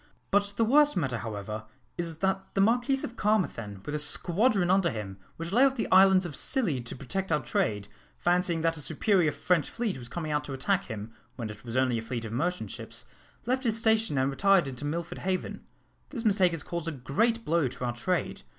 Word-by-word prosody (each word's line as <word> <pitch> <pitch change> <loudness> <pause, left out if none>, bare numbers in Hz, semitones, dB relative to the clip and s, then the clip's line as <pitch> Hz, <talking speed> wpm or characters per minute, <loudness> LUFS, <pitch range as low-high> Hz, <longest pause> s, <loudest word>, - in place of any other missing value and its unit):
But 200 0 +2
the 230 - +3
worst 290 +1 +4
matter, 130 -8 -1
however, 110 -1 -5 0.3
is, 165 -2 -3
that 190 +2 -2
the - - +1
Marquis 245 +6 +2
of 235 - -5
Carmarthen, 115 - -1
with 145 - -4
a 150 - -1
squadron 180 - +2
under 190 -2 +3
him, 100 -6 -6 0.2
which 165 +1 -5
lay 240 +6 +5
off 270 -1 +4
the 235 - -2
islands 190 0 +6
of 160 -5 -5
Scilly 190 - +1
to - - -6
protect 165 +9 -4
our 150 - +3
trade, 105 -2 -1 0.3
fancying 175 -1 +1
that 165 0 +1
a - - -4
superior 180 0 +2
French 170 +1 +1
fleet 225 - -3
was 120 -1 -9
coming 160 -3 -4
out 150 0 0
to 140 - -6
attack 185 +9 0
him, 110 +1 -7 0.2
when 115 -4 -5
it 105 0 -12
was 120 +1 -4
only 130 -3 +2
a - - -5
fleet 115 0 -4
of 110 - -6
merchant 175 +9 -1
ships, - - -7 0.4
left 260 +2 0
his 225 -3 +1
station 220 -7 +2
and 130 +1 +2
retired 195 +1 +3
into 135 +2 -6
Milford 170 +3 -4
Haven. 185 0 -3 0.4
This 235 -5 -5
mistake 190 -4 +4
has 160 -2 -4
caused 170 -1 -4
a - - 0
great 225 - 0
blow 165 -3 +2
to 125 0 -5
our 120 - -1
trade. 175 - -2
170 Hz, 215 wpm, -28 LUFS, 130-200 Hz, 0.4 s, islands